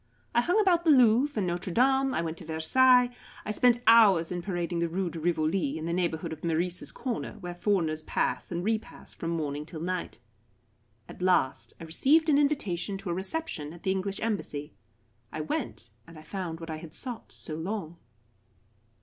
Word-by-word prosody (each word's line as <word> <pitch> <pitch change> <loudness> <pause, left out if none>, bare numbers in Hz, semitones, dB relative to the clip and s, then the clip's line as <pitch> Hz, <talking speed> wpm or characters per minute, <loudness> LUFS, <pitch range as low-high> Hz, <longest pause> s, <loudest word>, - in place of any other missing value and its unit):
I 235 - +4
hung 355 - +2
about 360 -5 +3
the 330 - +2
Louvre 255 0 +5
and - - 0
Notre 175 +1 -3
Dame. 265 +5 +3
I 170 - 0
went 160 -1 -3
to - - -10
Versailles. 250 +11 +4 0.3
I - - -2
spent 240 +2 +3
hours 200 -8 +6
in 175 -1 -2
parading 175 -2 -2
the 170 0 0
Rue 180 +1 -2
de 165 - -6
Rivoli, 160 -1 0
in 160 - -5
the 170 - -1
neighbourhood 170 -3 -1
of 155 - -11
Meurice's 170 +2 -1
corner, 245 -4 -4
where 180 -5 -7
foreigners 175 -4 0
pass - - -2
and 175 0 -2
re 220 +2 +1
pass - - -10
from 165 - -5
morning 150 -3 -2
till 160 +1 -9
night. 180 +2 -3 0.9
At - - -11
last 180 -8 +2
I - - -8
received 295 - +3
an 290 -1 +5
invitation 205 - 0
to 195 -2 -5
a - - 0
reception 190 - -3
at 170 - -14
the 190 - +1
English 195 +1 -2
Embassy. 175 -10 -3 0.6
I - - -4
went, 115 -7 -4 0.2
and 165 -1 -13
I 155 - -12
found 175 -3 -5
what 165 -1 -7
I 155 - -4
had 155 0 -9
sought 245 -4 -7
so 155 - -6
long. 170 0 -4
180 Hz, 190 wpm, -28 LUFS, 165-230 Hz, 0.9 s, hours